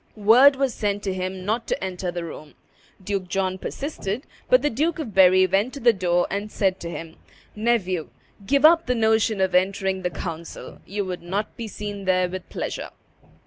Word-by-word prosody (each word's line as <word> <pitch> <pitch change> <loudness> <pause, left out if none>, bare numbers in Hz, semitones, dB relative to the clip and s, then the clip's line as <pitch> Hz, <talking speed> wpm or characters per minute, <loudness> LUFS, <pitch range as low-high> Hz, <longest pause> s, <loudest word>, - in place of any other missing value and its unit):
Word 235 +7 +6
was 270 -2 0
sent 205 -1 -2
to 195 - -1
him 185 0 -4
not 225 +3 -1
to - - -2
enter 185 -1 -3
the 175 0 -4
room. 155 -2 -9 0.5
Duke 195 -1 -2
John 185 0 -1
persisted; 260 -4 -4 0.3
but - - +5
the 295 - +1
Duke 305 +8 0
of 275 -10 -5
Berry 185 0 +6
went 200 +8 0
to - - -6
the 235 -2 +5
door 175 -2 +1
and 205 +2 -3
said 190 -2 0
to 170 - -6
him, 165 -1 -8 0.4
"Nephew, 205 -7 0 0.3
give 275 +7 +3
up 335 +1 +6
the 250 - +1
notion 220 -2 +2
of 190 -1 +1
entering 190 +1 +1
the 180 - -1
council; 165 0 -7
you 200 +1 -3
would 180 -1 -5
not 195 +5 -3
be 230 - -6
seen 205 -1 -6
there 185 -1 +2
with 185 0 -7
pleasure." - - -4
195 Hz, 190 wpm, -24 LUFS, 185-225 Hz, 0.5 s, Word